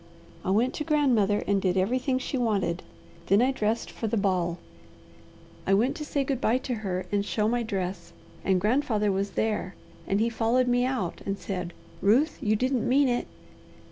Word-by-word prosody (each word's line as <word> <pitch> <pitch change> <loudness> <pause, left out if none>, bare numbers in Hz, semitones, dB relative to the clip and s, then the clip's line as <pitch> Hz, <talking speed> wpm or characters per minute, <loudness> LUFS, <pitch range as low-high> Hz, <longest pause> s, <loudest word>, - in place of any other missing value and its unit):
I - - -2
went 230 +6 +2
to 300 - -3
grandmother 250 -10 +2
and 200 -1 +1
did 185 -1 +1
everything 255 +7 +1
she 260 - -4
wanted, 200 -8 0 0.5
then 200 - +5
I 255 +3 +3
dressed 225 -2 -1
for 225 - -4
the 225 - 0
ball. 180 -4 0 1.1
I 195 - +5
went 235 +7 +2
to 305 - -5
say 285 -1 0
good 270 -2 -2
bye 230 +3 +3
to 260 0 -4
her 185 -3 -2
and 205 -1 +1
show 210 +1 0
my 240 +2 +1
dress 190 -5 -4 0.3
and 190 -1 +2
grandfather 215 -1 +1
was 195 +1 -2
there, 210 -4 -1 0.3
and 195 - +1
he 225 - +2
followed 235 +2 +1
me 245 0 +2
out 250 -10 -2
and 195 0 -2
said, 180 -4 -4 0.3
'Ruth, 250 - +3
you 215 0 +2
didn't 250 +1 0
mean 275 +2 +4
it?' 245 0 -1
220 Hz, 185 wpm, -27 LUFS, 195-255 Hz, 1.1 s, then